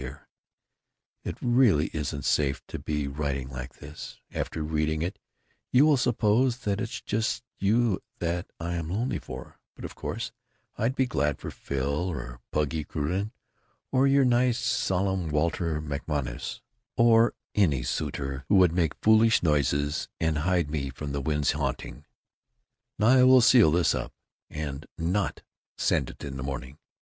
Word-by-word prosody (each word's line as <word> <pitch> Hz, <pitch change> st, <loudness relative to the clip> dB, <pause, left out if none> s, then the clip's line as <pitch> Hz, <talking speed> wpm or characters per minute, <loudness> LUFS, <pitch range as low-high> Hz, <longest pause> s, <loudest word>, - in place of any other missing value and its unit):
Dear, 65 Hz, +2 st, -8 dB, 1.0 s
it -, -, -5 dB
really 120 Hz, -, +4 dB
isn't 70 Hz, -2 st, -3 dB
safe 70 Hz, -2 st, +1 dB
to -, -, -5 dB
be 75 Hz, -2 st, -2 dB
writing 70 Hz, -2 st, -3 dB
like 65 Hz, -1 st, -7 dB
this, 70 Hz, +2 st, -9 dB, 0.2 s
after 80 Hz, -, -3 dB
reading 80 Hz, 0 st, 0 dB
it 95 Hz, +4 st, -4 dB, 0.5 s
you 130 Hz, +4 st, +6 dB
will 155 Hz, -2 st, +5 dB
suppose 120 Hz, 0 st, +2 dB
that 100 Hz, 0 st, -1 dB
it's -, -, -4 dB
just 110 Hz, +2 st, -1 dB, 0.2 s
you 110 Hz, +1 st, +2 dB, 0.2 s
that 85 Hz, 0 st, -2 dB
I 85 Hz, +1 st, -3 dB
am 85 Hz, -2 st, -3 dB
lonely 115 Hz, +8 st, -1 dB
for, -, -, -9 dB, 0.2 s
but -, -, -8 dB
of -, -, -7 dB
course -, -, -4 dB, 0.4 s
I'd 120 Hz, +5 st, 0 dB
be 130 Hz, -, +2 dB
glad 75 Hz, -, 0 dB
for -, -, -7 dB
Phil 70 Hz, +6 st, -2 dB
or 60 Hz, -6 st, -6 dB
Puggy 75 Hz, +1 st, 0 dB
Crewden 90 Hz, +9 st, -2 dB, 0.6 s
or 135 Hz, +1 st, +4 dB
your 135 Hz, 0 st, +4 dB
nice 120 Hz, -1 st, +3 dB
solemn 95 Hz, -6 st, 0 dB
Walter 80 Hz, +1 st, 0 dB
MacMonnies 70 Hz, -4 st, -4 dB, 0.4 s
or 115 Hz, 0 st, +5 dB, 0.2 s
any 75 Hz, -12 st, +2 dB
suitor 70 Hz, +2 st, -3 dB
who 100 Hz, -, +5 dB
would 90 Hz, -3 st, +6 dB
make 85 Hz, -4 st, +1 dB
foolish 110 Hz, 0 st, +5 dB
noises 75 Hz, -1 st, +1 dB
& -, -, -66 dB
hide 80 Hz, 0 st, +1 dB
me 70 Hz, -3 st, -2 dB
from 70 Hz, +2 st, -6 dB
the 70 Hz, 0 st, -2 dB
wind's 75 Hz, +1 st, +1 dB
hunting. 70 Hz, -3 st, -4 dB, 0.9 s
Now 105 Hz, -, +2 dB
I 130 Hz, 0 st, +6 dB
will 130 Hz, 0 st, +8 dB
seal 120 Hz, -6 st, +7 dB
this 85 Hz, +2 st, +3 dB
up -, -, -4 dB, 0.5 s
& 70 Hz, -1 st, -4 dB
NOT 90 Hz, +4 st, -1 dB, 0.3 s
send -, -, +1 dB
it -, -, -11 dB
in 70 Hz, -2 st, -5 dB
the 65 Hz, -, -4 dB
morning. 65 Hz, +1 st, -6 dB
80 Hz, 155 wpm, -27 LUFS, 70-110 Hz, 1.0 s, will